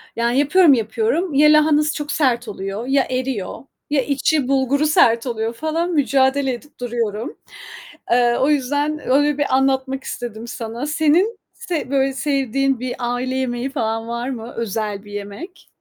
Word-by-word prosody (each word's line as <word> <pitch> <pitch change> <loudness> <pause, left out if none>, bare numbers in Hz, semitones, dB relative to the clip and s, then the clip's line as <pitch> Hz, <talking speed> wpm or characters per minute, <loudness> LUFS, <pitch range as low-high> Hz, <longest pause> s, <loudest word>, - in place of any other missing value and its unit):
yani, 235 +3 +1
yapıyorum 300 +1 +5
yapıyorum, 345 - 0
ya 300 +2 +6
lahanası 305 0 +3
çok 295 -1 -4
sert 250 -6 +1
oluyor, 200 +3 -5
ya 270 0 +2
eriyor, 255 -3 -3 0.3
ya 290 -2 +2
içi 280 +1 0
bulguru 275 +2 +2
sert 235 -4 +3
oluyor 225 -1 -2
falan 320 +7 -2
mücadele 270 -2 +2
edip 290 +4 -11
duruyorum. 230 -1 -3 0.7
Eee, 240 0 +3
o 275 - +3
yüzden 290 +2 0
öyle 290 +2 +3
bir 285 -2 +1
anlatmak 265 0 0
istedim 235 -1 -6
sana. 235 +2 -5
Senin 320 +9 +2 0.2
se 315 -6 -4
böyle 270 -1 +2
sevdiğin 275 -2 0
bir 250 0 -4
aile 245 +2 -2
yemeği 255 0 -2
falan 225 -4 -2
var 235 +2 -3
mı? 235 -2 -6
Özel 210 -2 -3
bir 205 - -12
yemek. 205 - -8
265 Hz, 150 wpm, -20 LUFS, 235-290 Hz, 0.7 s, ya